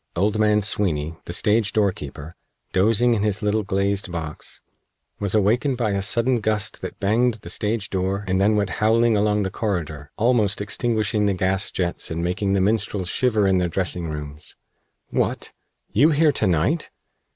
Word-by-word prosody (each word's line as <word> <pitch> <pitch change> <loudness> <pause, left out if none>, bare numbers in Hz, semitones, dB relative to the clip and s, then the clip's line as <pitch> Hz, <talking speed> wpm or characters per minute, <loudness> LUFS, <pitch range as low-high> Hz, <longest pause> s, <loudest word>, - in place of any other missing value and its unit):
Old 105 +4 0
man 105 -1 +3
Sweeny, 80 -6 0
the - - -6
stage 105 +3 +3
doorkeeper, 80 -7 -2 0.4
dozing 115 +5 +3
in 110 - 0
his 105 0 0
little 105 +1 +1
glazed 100 -1 -1
box, 80 -3 -6 0.6
was 100 0 0
awakened 120 +6 +2
by 115 -4 0
a 100 0 -1
sudden 115 +5 +1
gust 105 0 -1
that - - -7
banged 115 +4 +2
the 100 -6 -10
stage 105 +2 0
door 95 +1 -1
and 95 0 +1
then 105 +2 +3
went 100 -2 0
howling 115 +1 +3
along 105 0 +1
the 95 - -3
corridor, 80 -9 -3
almost 110 -3 +2
extinguishing 105 0 0
the 100 - +1
gas 95 +1 0
jets 90 -2 -2
and 80 +1 -3
making 95 +3 -1
the 100 - +2
minstrels 100 -2 0
shiver 110 -5 +1
in 95 -1 +3
their 90 -1 0
dressing 90 -2 -2
rooms. 75 -1 -8 0.6
"What! - - -1 0.4
You 140 +9 +5
here 155 0 +3
to 110 -6 0
night!" 90 - 0
100 Hz, 170 wpm, -22 LUFS, 95-110 Hz, 0.6 s, You